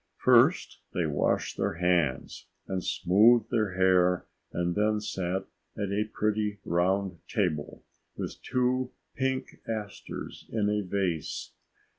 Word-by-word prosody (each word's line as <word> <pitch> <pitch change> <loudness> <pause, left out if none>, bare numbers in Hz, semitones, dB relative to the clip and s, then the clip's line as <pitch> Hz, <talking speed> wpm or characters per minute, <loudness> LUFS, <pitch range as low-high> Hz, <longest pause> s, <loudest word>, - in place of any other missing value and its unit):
First - - +4 0.2
they 85 - +1
washed 75 -2 0
their - - 0
hands 85 -6 0 0.2
and 95 -1 -2
smoothed 110 +5 +4
their 110 -5 +1
hair 90 -1 +3 0.3
and 85 0 -1
then 105 +2 +2
sat 95 -3 -2 0.3
at 100 -2 -2
a 105 +2 +1
pretty 105 -1 0
round 90 +1 +1
table 85 -9 -2 0.3
with - - -5
two 125 0 0 0.2
pink 130 0 -2
asters 110 -3 -6
in 105 -2 +1
a 105 0 +1
vase. 90 -5 -2
100 Hz, 120 wpm, -29 LUFS, 90-110 Hz, 0.3 s, First